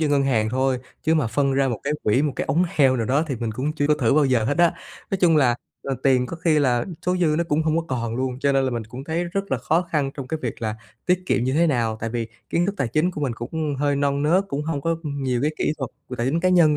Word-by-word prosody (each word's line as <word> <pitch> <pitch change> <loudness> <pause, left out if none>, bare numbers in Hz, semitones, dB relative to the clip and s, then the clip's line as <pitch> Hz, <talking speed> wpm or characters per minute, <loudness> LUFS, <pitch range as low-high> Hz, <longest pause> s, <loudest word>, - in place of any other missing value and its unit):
dư 155 - +2
ngân 145 -1 +3
hàng 115 -6 +1
thôi, 130 +1 +1 0.2
chứ 160 - +2
mà 155 -6 +2
phân 135 +5 +1
ra 135 0 +2
một 115 -4 -3
cái 140 - -1
quỹ, 110 +6 +2
một 150 -2 0
cái - - -1
ống 155 +6 +2
heo 135 -5 +3
nào 115 -3 -1
đó 140 +5 +2
thì 135 -5 -3
mình 115 -1 -3
cũng 130 +7 -2
chưa 145 -2 0
có 150 - +4
thử 135 -5 +2
bao 150 -1 +4
giờ 125 -5 +2
hết 145 +8 -1
á. 175 0 +4 0.4
Nói 195 - 0
chung 165 -3 +5
là, 130 -5 +4 0.3
ờ, 135 - -2
tiền 130 -2 +3
có 170 - -6
khi 165 -2 +2
là 125 -4 +2 0.2
số 180 - +2
dư 165 -4 +2
nó 170 - +1
cũng 150 +2 +2
hông 155 0 +1
có 165 - 0
còn 115 -3 -2
luôn, 130 0 -2
cho 140 0 +2
nên 135 -1 +2
là 130 - 0
mình 120 -2 -3
cũng 125 +5 -9
thấy 165 +3 -1
rất 195 +3 -3
là 135 - +1
khó 155 +7 +1
khăn 150 -6 -1
trong 135 -3 -6
cái 160 - -2
việc 120 -1 -4
là 110 0 -2 0.3
tiết 180 0 +2
kiệm 120 - +1
như 130 - 0
thế 165 +4 +3
nào. 115 -7 0
Tại 115 - -3
vì 115 -1 -3 0.2
kiến 175 +1 +2
thức 200 - -1
tài 135 -9 -1
chính 155 +9 +1
của 160 - -7
mình 140 -4 0
cũng 145 +5 -3
hơi 145 0 +1
non 140 0 0
nớt, 175 +6 +3
cũng 140 +2 -2
hông 155 -2 -2
có 165 +3 0
nhiều 135 -5 -2
cái 150 - +2
kỹ - - +1
thuật 130 -5 -4 0.2
về 125 - -5
tài 120 - -1
chính 155 +6 +1
cá 185 - +2
nhân 170 -5 +5
140 Hz, 310 wpm, -23 LUFS, 125-160 Hz, 0.4 s, chung